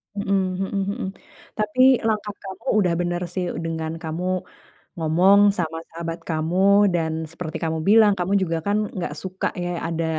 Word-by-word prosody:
Mhm 200 -1 0 0.2
mhm 195 +1 -1
mhm. 190 - -4 0.5
Tapi, 215 +4 0 0.3
langkah 210 -1 -1
kamu 190 +2 -9
udah 180 -4 +2
bener 175 0 -1
sih, 185 -2 -1 0.2
dengan 160 -1 -3
kamu 165 +3 -3 0.7
ngomong 175 +5 +4 0.2
sama 165 -2 -2
sahabat 165 0 -5
kamu, 160 +2 -1 0.4
dan 165 -2 0 0.2
seperti 165 -2 -5
kamu 160 0 -1
bilang, 215 -1 +6
kamu 180 +2 -1
juga 165 -3 0
kan, 205 +1 +1 0.2
nggak 180 - -3
suka, 190 0 -3 0.2
ya, 175 - -2 0.2
ada 165 0 -2
175 Hz, 155 wpm, -23 LUFS, 165-200 Hz, 0.7 s, bilang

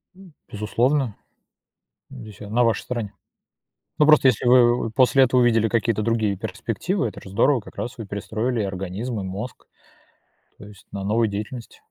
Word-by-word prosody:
М, 190 -4 -16 0.2
безусловно, 120 +4 0 0.9
здесь 110 -7 -11
я 105 - -8
на 120 +3 +2
вашей 115 -1 +1
стороне. 115 -5 -5 0.9
Ну, 150 - +6
просто 150 -3 +6
если 125 0 +2
вы 120 -2 +4
после 130 +2 +4
этого 125 0 +3
увидели 115 -2 +3
какие-то 115 -1 0
другие 110 -4 0
перспективы, 115 - -3
это - - -9
же 95 - -11
здорово, 120 +6 +2
как - - -14
раз 120 - -5
вы 115 - -6
перестроили 110 +4 -2
и - - -1
организм, 95 +5 -4
и 95 - -4
мозг, 100 +6 -7 0.9
то 100 - -12
есть 100 -2 -16
на 100 -1 -5
новую 110 +2 +1
деятельность. 105 +4 -7
115 Hz, 165 wpm, -23 LUFS, 105-125 Hz, 0.9 s, Ну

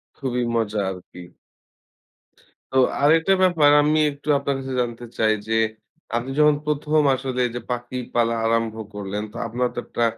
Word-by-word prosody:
খুবই 125 -2 -2
মজা 110 -2 0
আরকি। 90 -1 -9 1.5
তো 130 - +1 0.2
আরেকটা 160 +5 +4
ব্যাপার 165 -5 +4
আমি 155 +1 +2
একটু 140 +1 -15
আপনার 140 0 -1
কাছে 135 0 -5
জানতে 120 0 -4
চাই 110 0 +3
যে, 115 0 +1 0.6
আপনি 120 +3 -2
যখন 150 -1 +5
১ম 150 +1 +1
আসলে 130 -1 -3
যে 120 - -2
পাখি 120 +1 -4 0.2
পালা 115 -1 +2
আরম্ভ 115 -1 0 0.2
করলেন। 105 +1 -4
তো 120 - -10
আপনার 125 +2 -1
তো - - -2
একটা 120 - -2
125 Hz, 155 wpm, -22 LUFS, 115-145 Hz, 1.5 s, যখন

